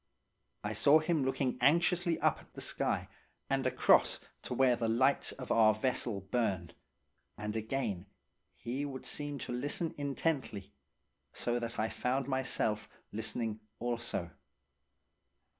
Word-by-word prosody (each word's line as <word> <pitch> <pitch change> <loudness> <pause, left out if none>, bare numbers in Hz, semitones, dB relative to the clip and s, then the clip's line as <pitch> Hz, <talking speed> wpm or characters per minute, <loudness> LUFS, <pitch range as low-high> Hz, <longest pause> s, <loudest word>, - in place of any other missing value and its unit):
I 105 +1 -2
saw 140 +8 +6
him 155 -2 +1
looking 130 -1 0
anxiously 170 +4 +3
up - - +3
at - - -19
the - - -8
sky - - 0 0.4
and - - +2
across - - +4 0.2
to 125 - -4
where 130 -1 +5
the 115 -1 -1
lights 130 +5 +3
of 130 -2 -7
our 110 -2 +6
vessel 115 -3 -1
burned, 95 -5 -1 0.6
and 105 +1 -4
again 110 -4 -2 0.5
he 130 +4 -3
would 135 -3 -5
seem 145 -1 -3
to - - -5
listen 145 +6 -1
intently, 135 - -2 0.6
so 120 0 0
that 115 0 -4
I 110 +1 +1
found 130 +1 -1
myself 130 -5 0 0.2
listening 110 0 -2 0.2
also. 120 -7 -2
120 Hz, 130 wpm, -33 LUFS, 110-140 Hz, 0.6 s, saw